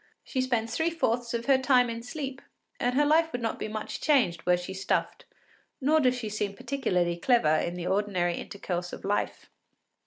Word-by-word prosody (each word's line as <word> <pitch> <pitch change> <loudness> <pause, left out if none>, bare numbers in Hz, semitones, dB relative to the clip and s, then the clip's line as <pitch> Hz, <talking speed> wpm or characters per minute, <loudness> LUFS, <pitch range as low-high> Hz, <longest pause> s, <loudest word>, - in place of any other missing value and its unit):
She 260 - -2
spends 235 -3 -1
three 325 +1 +2
fourths 240 -8 -1
of 235 0 -3
her 270 -1 +4
time 255 -2 +4
in 230 0 -4
sleep, 270 +1 -6 0.4
and 245 +1 0
her 295 +2 +4
life 320 +2 +3
would 245 - -3
not 225 - -2
be - - -3
much 215 0 -5
changed 230 - +2
were 180 0 +5
she 180 +2 -6
stuffed, 190 +1 -1 0.5
nor 300 +4 +3
does 255 -3 +3
she 235 -3 -4
seem 210 -1 -3
particularly 180 -11 -1
clever 175 -7 +3
in 175 +2 -2
the 175 -1 -5
ordinary 185 -3 0
intercourse 180 -3 -4
of - - -8
life. 205 +1 -2
230 Hz, 190 wpm, -28 LUFS, 190-265 Hz, 0.5 s, were